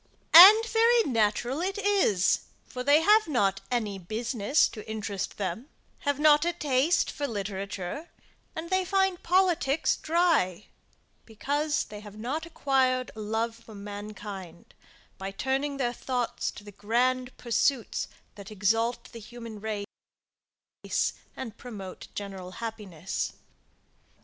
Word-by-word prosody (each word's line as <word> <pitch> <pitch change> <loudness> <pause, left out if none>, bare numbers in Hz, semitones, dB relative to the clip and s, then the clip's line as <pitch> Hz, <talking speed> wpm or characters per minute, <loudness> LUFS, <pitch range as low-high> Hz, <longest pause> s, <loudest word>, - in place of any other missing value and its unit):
And 410 +7 +11
very 460 +1 +4
natural 240 - 0
it 390 +3 -2
is 390 - +2 0.2
for 250 -1 -6
they 290 +4 +5
have 420 +4 +5
not 200 -9 +1
any 215 -5 -2
business 225 - +1
to 215 -1 -10
interest 205 -3 -4
them, 205 - -4 0.3
have 285 -2 -1
not 300 0 +5
a 345 +1 0
taste 295 0 +1
for 290 -1 -3
literature, 200 - -5 0.5
and 330 +2 -6
they 375 0 +2
find 385 -1 +1
politics 345 -5 +2
dry, 315 - +1 0.6
because 290 +7 -1
they 210 0 -9
have 210 0 -12
not 280 +9 -4
acquired 260 -5 +1
a - - -9
love 220 +2 -1
for 230 -2 -14
mankind 200 -3 -8 0.5
by 190 0 -4
turning 270 +7 -2
their 245 -3 -1
thoughts 245 -1 -2
to - - -10
the 205 - -11
grand 250 +5 0
pursuits 240 +1 0 0.3
that 200 -2 -11
exalt 225 +4 0
the 230 - -9
human 230 -1 -9
race 210 -2 -6 0.2
and 230 -5 -7
promote 200 -7 -9
general 190 -3 -7
happiness. 200 -6 -5
240 Hz, 125 wpm, -28 LUFS, 205-295 Hz, 0.6 s, And